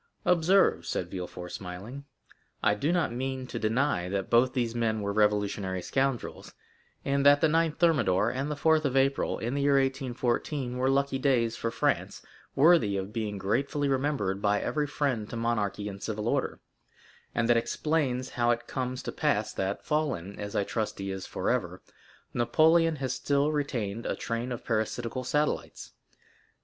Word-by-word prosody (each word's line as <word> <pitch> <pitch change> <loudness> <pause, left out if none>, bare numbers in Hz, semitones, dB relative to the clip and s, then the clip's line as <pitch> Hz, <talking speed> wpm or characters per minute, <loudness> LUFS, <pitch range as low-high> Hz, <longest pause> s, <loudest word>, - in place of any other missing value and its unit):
Observe," 180 +2 +4
said 90 - -3
Villefort, 90 -1 -6
smiling, 100 +10 -7 0.6
"I - - +4
do 140 +10 0
not 170 -9 +1
mean 130 +1 -3
to 120 -2 -5
deny 110 -5 0
that 95 0 -3
both 125 +2 +4
these 120 -4 -1
men 110 -2 0
were 100 0 -2
revolutionary 105 -3 +1
scoundrels, 135 0 -2 0.5
and 140 0 +1
that 145 0 +7
the - - +3
9th 160 0 +2
Thermidor 140 - +3
and 135 +3 -3
the 150 - -2
4th 155 +2 +3
of 135 -2 0
April, 135 +1 +1
in 120 +3 -3
the 140 - -1
year 140 0 +3
1814, 130 0 -1
were 130 +1 +1
lucky 135 0 +1
days 120 -4 +2
for 115 - -2
France, - - -1 0.3
worthy 140 - +5
of 95 +2 -5
being 105 -2 -3
gratefully 140 - 0
remembered 130 -8 0
by 105 0 +2
every 150 -1 -1
friend 130 -7 -1
to - - -6
monarchy 105 -3 -1
and 100 -1 -7
civil 110 0 -3
order; - - -1 0.8
and 115 - +1
that 120 - +5
explains 130 +1 0
how 120 -1 +1
it 120 0 +1
comes 130 0 -4
to - - -4
pass - - 0
that, 95 +1 -3
fallen, 135 - -2
as 105 0 -5
I 100 - +2
trust 110 +1 -3
he 95 0 -4
is 95 -1 -5
forever, - - -1 0.5
Napoleon 160 +6 +4
has 130 -3 -2
still 140 +3 +1
retained 120 -8 -2
a - - -1
train 115 +2 -3
of 120 - -5
parasitical 115 +3 -2
satellites. 150 +4 -2
125 Hz, 165 wpm, -28 LUFS, 105-140 Hz, 0.8 s, that